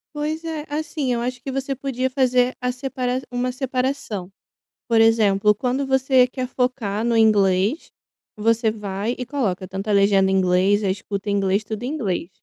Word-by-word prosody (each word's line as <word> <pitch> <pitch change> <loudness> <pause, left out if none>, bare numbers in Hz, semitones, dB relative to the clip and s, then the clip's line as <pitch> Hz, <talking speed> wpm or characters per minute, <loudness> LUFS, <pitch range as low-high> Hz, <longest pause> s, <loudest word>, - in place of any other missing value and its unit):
Pois 305 +2 -3
é. 320 -2 -4
Assim, 295 -3 -2
eu 235 - -1
acho 250 0 -4
que 270 - -6
você 270 +1 -2
podia 260 -1 -2
fazer 255 -1 +2
a 250 0 -1
separa 255 0 -3
uma 245 +1 -1
separação. 255 -7 -3 0.6
Por 230 -1 +4
exemplo: 210 -2 +4
quando 260 +5 -1
você 265 -1 +4
quer 255 0 -4
focar 245 -5 -1
no 235 -1 +1
inglês, 205 - +2 0.5
você 225 +1 +2
vai 210 +2 -3
e 250 - -4
coloca 215 -9 -2
tanto 195 +3 -5
a - - +2
legenda 200 -1 +4
em 190 - +2
inglês, 190 +3 +3
a 195 - +1
escuta 200 +1 -4
em - - +1
inglês, 195 +1 +1
tudo 215 0 -6
em - - -2
inglês, 195 - -2
240 Hz, 180 wpm, -22 LUFS, 200-260 Hz, 0.6 s, Por